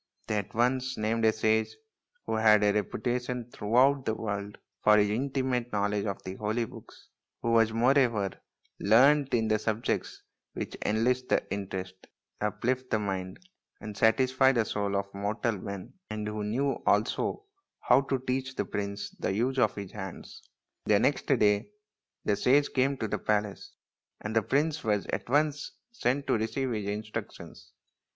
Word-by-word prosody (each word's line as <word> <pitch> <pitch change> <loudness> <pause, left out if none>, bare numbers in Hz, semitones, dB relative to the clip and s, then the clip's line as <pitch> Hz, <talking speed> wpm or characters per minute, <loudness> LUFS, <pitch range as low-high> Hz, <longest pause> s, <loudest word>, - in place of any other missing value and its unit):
They 105 - 0
at 100 +1 -8
once 130 +2 +1
named 110 +1 0
a 110 - +6
sage 110 0 +1 0.5
who - - -2
had 110 -1 +5
a 105 -1 +4
reputation 120 +3 -2
throughout 130 +6 +3
the 110 - -1
world 100 -2 -4 0.3
for 105 0 +6
his 105 -1 +3
intimate 130 0 -1
knowledge 100 0 0
of 100 - -4
the 95 - -5
holy 110 +2 -1
books, - - -14 0.3
who 115 - +1
was, 115 -1 +4
moreover, 115 -4 +2 0.5
learned 135 +7 +5
in 115 -2 +2
the 110 0 +2
subjects 110 +1 -2 0.3
which - - -5
enlist 125 +4 +1
the - - +2
interest, 95 -2 -6 0.3
uplift 125 +5 -1
the - - +2
mind, 95 - -4 0.3
and 105 -1 -7
satisfy 130 +4 +4
the 115 -4 +1
soul 100 -2 -2
of 100 0 0
mortal 105 +4 -1
men, 100 -1 -7 0.2
and 105 0 -4
who 105 0 -3
knew 135 +6 -1
also 410 - +1 0.4
how 125 +2 +5
to 135 0 -1
teach 130 +1 -2
the - - -1
prince 100 0 -4
the - - -1
use 125 +6 0
of 110 -4 +3
his 100 -2 -6
hands. 95 -3 -9 0.4
The - - +4
next - - +1
day 105 - +3 0.6
the 105 - +2
sage 140 +6 +3
came 135 +1 +2
to 110 - -2
the - - -2
palace, 105 -1 -2 0.4
and 105 +1 -5
the 115 - +5
prince 150 +8 0
was 105 -3 0
at - - -3
once 145 +1 +1 0.2
sent 140 - -1
to - - +1
receive 120 +4 -2
his 105 -3 -3
instructions. 105 +1 -6
110 Hz, 160 wpm, -29 LUFS, 105-130 Hz, 0.6 s, a